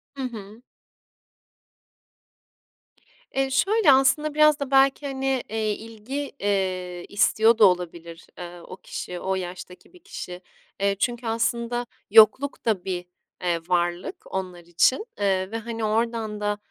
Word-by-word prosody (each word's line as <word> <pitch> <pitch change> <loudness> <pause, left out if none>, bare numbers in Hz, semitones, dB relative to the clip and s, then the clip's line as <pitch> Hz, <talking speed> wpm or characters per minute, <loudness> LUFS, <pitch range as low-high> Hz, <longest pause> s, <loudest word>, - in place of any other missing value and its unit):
Hı 270 - -5
hı. 220 -2 -7 2.7
Eee, 270 0 +1
şöyle 395 +5 +4
aslında; 270 +3 +3
biraz 305 0 +5
da 280 -1 -4
belki, 270 +1 +4
hani, 270 -1 -1
eee, 220 -1 -1
ilgi, 230 +7 -6
eee, 185 -3 -2
istiyor 220 +2 +3
da 220 - +7
olabilir, 170 -2 -1
eee, 175 -1 -8
o 185 - -10
kişi, 180 -1 -7
o 190 +1 -1
yaştaki 180 - -8
bir 360 - -16
kişi. 180 - -8 0.4
Eee, 200 0 +2
çünkü 240 -1 -1
aslında 235 +1 -1 0.3
yokluk 225 +6 +5
da 200 -5 0
bir, 180 -2 -3 0.4
eee, 175 -2 +1
varlık 175 0 0 0.2
onlar 185 -2 -4
için, 175 - +2
eee, 190 -1 0
ve, 225 - -2
hani, 230 0 -5
oradan 220 0 -1
da, 205 0 0
215 Hz, 135 wpm, -24 LUFS, 185-260 Hz, 2.7 s, da